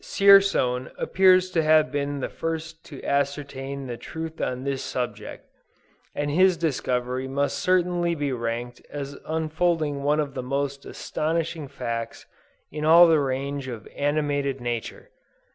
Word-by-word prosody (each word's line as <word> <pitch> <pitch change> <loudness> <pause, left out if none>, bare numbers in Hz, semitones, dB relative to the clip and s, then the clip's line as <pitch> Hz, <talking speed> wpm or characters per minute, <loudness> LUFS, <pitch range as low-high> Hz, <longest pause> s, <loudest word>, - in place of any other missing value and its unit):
Dzierzon 195 -11 +4
appears 185 0 +4
to 165 - +2
have 155 0 +4
been 145 -1 -2
the - - -1
first 165 0 -5
to 140 - -10
ascertain 140 -1 -2
the 120 -2 -5
truth 160 +3 -7
on 125 0 -2
this 140 -1 -2
subject; 125 -1 -5 0.7
and 145 0 -1
his 185 +3 +4
discovery 130 -4 -1
must 140 +1 -1
certainly 175 -2 +1
be 145 -3 -2
ranked 120 0 -4
as 140 -1 -6
unfolding 160 -2 0
one 145 +2 +2
of 145 -2 -2
the 130 - -4
most 140 +2 -3
astonishing 160 -1 -3
facts 115 -4 -5 0.5
in 150 +1 -5
all 170 +3 +8
the 160 -2 +4
range 140 0 -2
of 115 -4 -7
animated 145 -2 0
nature. 120 - -5
145 Hz, 140 wpm, -25 LUFS, 135-160 Hz, 0.7 s, all